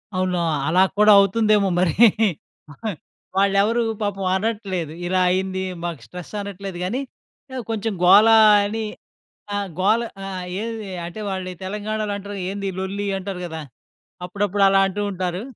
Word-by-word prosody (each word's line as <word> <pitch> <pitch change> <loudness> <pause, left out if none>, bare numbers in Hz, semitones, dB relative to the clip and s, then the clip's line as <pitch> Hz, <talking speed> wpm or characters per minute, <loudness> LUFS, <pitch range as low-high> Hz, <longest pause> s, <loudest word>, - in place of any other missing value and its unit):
అవునా! 185 -1 0 0.3
అలా 180 +4 +4
కూడా 210 0 +6
అవుతుందేమో 205 0 +3
మరి. 180 -4 +2 1.4
వాళ్ళు 195 0 +3
ఎవరూ 230 +3 +1 0.2
పాపం 195 -2 -2
అనట్లేదు. 190 -6 -2
ఇలా 185 +1 +1
అయింది, 190 0 -1 0.2
మాకు 170 -8 -4
స్ట్రెస్ 180 - -10
అనట్లేదు 195 -2 -7
కానీ, 245 +9 -2 0.5
ఆ - - -3
కొంచెం 220 -1 -2
గోల 210 +5 +7 0.4
అని 220 +1 -3 0.7
ఆ! - - 0 0.2
గోల 215 +5 +3 0.2
ఆ! - - -5 0.4
ఏది 225 -3 -5 0.2
అంటే 175 +5 -8
వాళ్ళు 185 -1 -4
తెలంగాణలో 210 +1 -3
అంటరు. 205 0 -8
ఏంది 200 0 -5
ఈ - - -10
లొల్లి 200 +2 -3
అంటారు 190 -1 -6
కదా! 160 -2 -6 0.6
అప్పుడప్పుడు 200 +1 -1
అలా 195 0 +4
అంటూ 205 +2 -3
ఉంటారు. 185 0 -3
195 Hz, 140 wpm, -22 LUFS, 185-210 Hz, 1.4 s, గోల